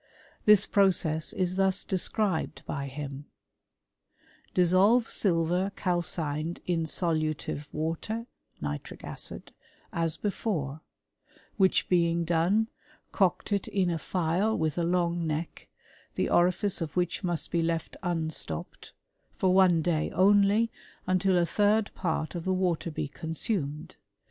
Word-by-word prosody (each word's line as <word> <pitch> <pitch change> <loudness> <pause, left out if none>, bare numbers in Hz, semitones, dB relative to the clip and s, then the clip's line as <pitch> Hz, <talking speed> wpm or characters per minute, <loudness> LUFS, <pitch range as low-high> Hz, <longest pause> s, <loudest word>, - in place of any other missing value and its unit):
This 210 -2 +7
process 175 -6 +2
is 185 0 -1
thus 190 -1 +2
described 190 -3 0
by 140 -1 -4
him: 140 0 -6 1.3
*^ - - -40
Dis 180 -2 +4
solve 215 +6 +5
silver 180 +1 +1
calcined 165 -3 -2
in 170 -2 0
solutive 155 -3 -1
water 165 +9 -3 0.3
(nitric 75 -1 -5
acid), - - -6 0.4
as 165 -2 0
before; 160 -8 -2 0.8
which 190 -2 +3
being 170 -1 +2
done, 175 +7 +2 0.5
coct 190 +1 +1
it 200 -2 0
in 185 -3 +1
a 165 - -2
phial 180 +7 0
with 155 -2 0
a - - +1
long 170 -1 0
neck, 155 +2 -4 0.5
the - - 0
orifice 180 +2 +2
of 155 -3 -4
which 180 +2 -1
must 175 -3 -2
be 170 - +1
left 165 0 -2
unstopped, 160 - -4 0.4
for 185 -1 +2
one 180 -4 +5
day 160 -2 0
only, 205 +4 +4 0.3
until 185 0 +2
a 175 - +3
third 210 +3 +2
part 160 -3 -2
of 170 -2 -4
the 190 - +1
water 180 -3 0
be 150 - -3
consumed. 160 0 -4
175 Hz, 130 wpm, -28 LUFS, 160-190 Hz, 1.3 s, This